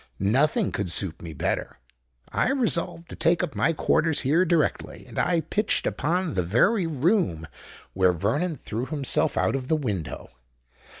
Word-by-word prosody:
Nothing 150 Hz, -, +1 dB
could 100 Hz, -3 st, -3 dB
suit 85 Hz, -1 st, 0 dB
me 85 Hz, -, -7 dB
better: 75 Hz, -, -3 dB, 0.5 s
I -, -, 0 dB
resolved 195 Hz, -10 st, +1 dB
to -, -, -8 dB
take 170 Hz, +2 st, +2 dB
up 160 Hz, -6 st, -3 dB
my -, -, +1 dB
quarters 160 Hz, 0 st, +1 dB
here 155 Hz, +7 st, +2 dB
directly;—and 165 Hz, -3 st, -1 dB
I 170 Hz, -2 st, +2 dB
pitched 205 Hz, +7 st, 0 dB
upon 175 Hz, +1 st, -1 dB
the 90 Hz, -, +1 dB
very 145 Hz, -, +2 dB
room 150 Hz, -, 0 dB, 0.5 s
where 95 Hz, -1 st, +3 dB
Vernon 140 Hz, -, -1 dB
threw 120 Hz, -1 st, -5 dB
himself 145 Hz, -4 st, 0 dB
out -, -, +1 dB
of 130 Hz, -2 st, -4 dB
the 160 Hz, -, +2 dB
window. 100 Hz, -, -4 dB
150 Hz, 155 wpm, -25 LUFS, -, 0.5 s, where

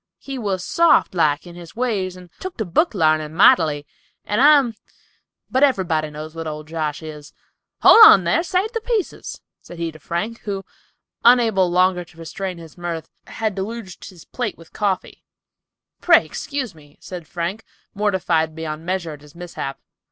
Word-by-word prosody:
He 270 Hz, -2 st, -7 dB
was 195 Hz, -5 st, -2 dB
soft 335 Hz, -, +3 dB
like 155 Hz, -4 st, +1 dB
in 175 Hz, -, -11 dB
his 170 Hz, +1 st, -12 dB
ways 210 Hz, -7 st, -1 dB
and 180 Hz, -2 st, -14 dB
took 375 Hz, -1 st, -7 dB
to 220 Hz, -, -2 dB
book 220 Hz, -, +1 dB
larnin 155 Hz, -3 st, +1 dB
mightily, 155 Hz, -5 st, +4 dB, 0.4 s
and 210 Hz, +4 st, 0 dB
I'm—but 265 Hz, -2 st, 0 dB
everybody 175 Hz, -, +1 dB
knows 155 Hz, +1 st, -8 dB
what 165 Hz, -1 st, -6 dB
old 155 Hz, 0 st, -6 dB
Josh 155 Hz, -1 st, -3 dB
is. 150 Hz, -2 st, -10 dB, 0.5 s
Hold 455 Hz, -, +10 dB
on 195 Hz, -, +9 dB
thar! 170 Hz, -, +2 dB
Save 370 Hz, +5 st, -1 dB
the 455 Hz, -2 st, -3 dB
pieces!" 450 Hz, -4 st, -3 dB, 0.2 s
said 175 Hz, -, -12 dB
he 165 Hz, -1 st, -3 dB
to 155 Hz, -, -15 dB
Frank, 190 Hz, +9 st, -4 dB
who, 195 Hz, -2 st, -5 dB, 0.6 s
unable 225 Hz, -6 st, +5 dB
longer 180 Hz, 0 st, +2 dB
to 165 Hz, -, -21 dB
restrain 180 Hz, +3 st, -5 dB
his 165 Hz, 0 st, -13 dB
mirth, 170 Hz, -2 st, -5 dB, 0.2 s
had 220 Hz, -2 st, -2 dB
deluged 195 Hz, 0 st, -6 dB
his 180 Hz, -4 st, -15 dB
plate 240 Hz, -5 st, -4 dB
with 165 Hz, -, -17 dB
coffee. 200 Hz, -3 st, -2 dB, 0.8 s
"Pray -, -, +5 dB
excuse 280 Hz, -8 st, -5 dB
me," 145 Hz, -2 st, -19 dB
said 175 Hz, -4 st, -9 dB
Frank, 175 Hz, +7 st, -4 dB, 0.3 s
mortified 180 Hz, -6 st, 0 dB
beyond 160 Hz, -1 st, -5 dB
measure 175 Hz, -2 st, -2 dB
at 145 Hz, -2 st, -10 dB
his 150 Hz, +1 st, -17 dB
mishap. 170 Hz, -6 st, -6 dB
180 Hz, 165 wpm, -21 LUFS, 160-220 Hz, 0.8 s, Hold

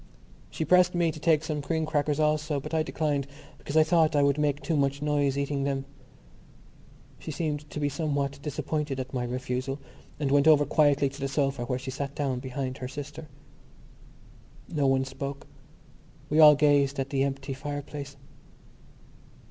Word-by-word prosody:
She 160 Hz, -, -3 dB
pressed 180 Hz, +2 st, +4 dB
me 170 Hz, -2 st, +2 dB
to 155 Hz, -, -9 dB
take 155 Hz, -1 st, +3 dB
some 155 Hz, -2 st, -3 dB
cream 160 Hz, +2 st, -1 dB
crackers 150 Hz, -1 st, 0 dB
also 150 Hz, -1 st, +1 dB
but 135 Hz, -, -8 dB
I 160 Hz, -, +2 dB
declined 145 Hz, -3 st, -1 dB, 0.3 s
because 145 Hz, -, -3 dB
I 155 Hz, -, +7 dB
thought 160 Hz, -1 st, +3 dB
I 145 Hz, -, +4 dB
would 140 Hz, +1 st, +2 dB
make 145 Hz, -1 st, +1 dB
too 165 Hz, -, 0 dB
much 140 Hz, -1 st, +1 dB
noise 145 Hz, -2 st, +1 dB
eating 140 Hz, 0 st, -1 dB
them. 135 Hz, -1 st, -1 dB, 1.3 s
She -, -, -8 dB
seemed 150 Hz, -2 st, -3 dB
to -, -, -5 dB
be 145 Hz, -, +1 dB
somewhat 140 Hz, -1 st, -2 dB
disappointed 150 Hz, -1 st, -3 dB
at 130 Hz, +1 st, -6 dB
my 125 Hz, -2 st, -1 dB
refusal 125 Hz, +2 st, -3 dB, 0.4 s
and 140 Hz, -3 st, 0 dB
went 145 Hz, +1 st, +4 dB
over 150 Hz, -2 st, +6 dB
quietly 145 Hz, -1 st, +3 dB
to 140 Hz, +2 st, -12 dB
the 135 Hz, -, 0 dB
sofa 135 Hz, -3 st, -1 dB
where 125 Hz, +1 st, -1 dB
she 130 Hz, +1 st, -6 dB
sat 140 Hz, +1 st, -5 dB
down 135 Hz, -4 st, -1 dB
behind 130 Hz, 0 st, -4 dB
her 125 Hz, -, -4 dB
sister. 145 Hz, +3 st, -8 dB, 1.5 s
No 145 Hz, -3 st, +2 dB
one 135 Hz, 0 st, +2 dB
spoke: 140 Hz, +1 st, -6 dB, 0.9 s
we 155 Hz, -, +3 dB
all 150 Hz, -1 st, +9 dB
gazed 145 Hz, -1 st, +3 dB
at 135 Hz, 0 st, -3 dB
the 135 Hz, -1 st, +1 dB
empty 135 Hz, 0 st, -3 dB
fireplace. 145 Hz, 0 st, -6 dB
145 Hz, 170 wpm, -27 LUFS, 135-150 Hz, 1.5 s, all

